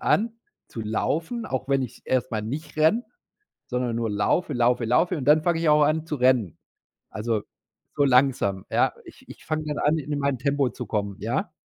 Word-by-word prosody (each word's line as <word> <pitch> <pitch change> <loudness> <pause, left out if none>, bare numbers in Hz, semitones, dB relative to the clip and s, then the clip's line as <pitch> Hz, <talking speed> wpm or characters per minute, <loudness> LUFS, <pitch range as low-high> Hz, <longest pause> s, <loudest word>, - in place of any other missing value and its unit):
an 225 +2 +1 0.3
zu 115 - -7
laufen, 165 - -2
auch 130 +1 -3
wenn 135 -1 +2
ich's 125 - -7
erst 130 -1 0
mal 110 -1 -1
nicht 150 +8 -6
renne, 160 +11 +3 0.6
sondern 125 -2 -1
nur 115 -2 -1
laufe, 105 +12 0
laufe, 120 0 +2
laufe 165 +10 +2
und 140 - -5
dann 155 +1 +5
fange 170 -2 +1
ich 165 - +1
auch 150 0 +5
an 155 +2 0
zu 150 - -3
rennen. 125 - +2 0.5
Also 110 -1 -2 0.5
so 145 - +2
langsam, 125 -8 +2
ja? - - +2
Ich - - -16
ich - - -12
fange 155 0 -2
dann 150 -1 -3
an, 155 +2 +2
in 145 0 -3
mein 140 -2 0
Tempo 140 -2 +1
zu 125 - -7
kommen, 100 -1 -2
ja? 130 - -2
135 Hz, 195 wpm, -25 LUFS, 120-155 Hz, 0.6 s, dann